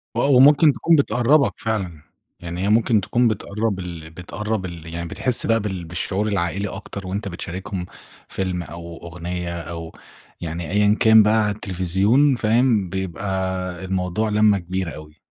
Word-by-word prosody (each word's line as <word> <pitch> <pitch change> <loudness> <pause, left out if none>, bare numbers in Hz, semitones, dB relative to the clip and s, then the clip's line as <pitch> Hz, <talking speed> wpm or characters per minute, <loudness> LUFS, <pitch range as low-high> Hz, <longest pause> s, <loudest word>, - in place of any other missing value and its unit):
آه، - - +1
ومُمكن 145 +3 +6
تكون 165 +6 +3
بتقرّبَك 140 0 +3
فعلًا. 95 -9 -3 0.4
يعني 85 +1 -6
هي 100 - 0
مُمكن 110 0 +3
تكون 120 +5 +1
بتقرّب 105 -1 -2
ال 85 -3 -7
بتقرّب 95 +4 -4
ال 85 -2 -8
يعني 85 0 -4
بتحس 125 -2 +3
بقى 115 0 +2
بال 95 -4 -4
بالشعور 95 +5 -2
العائلي 100 0 -1
أكتر، 100 0 -7
وأنت 100 +3 -3
بتشاركهم 90 +1 -5 0.4
فيلم 90 -2 -2
أو 85 0 -9
أغنية 85 0 -5
أو 85 0 -7 0.5
يعني، 85 +1 -4
أيًا 105 +1 +3
كان 110 -2 +7
بقى 110 +1 +3
على 105 - 0
التلفزيون 100 - +2
فاهم، 115 -4 +2
بيبقى 95 0 -3
الموضوع 95 +3 -1
لمّة 105 -1 +4
كبيرة 95 -1 -4
أوي. 75 +1 -12
95 Hz, 150 wpm, -22 LUFS, 85-110 Hz, 0.5 s, كان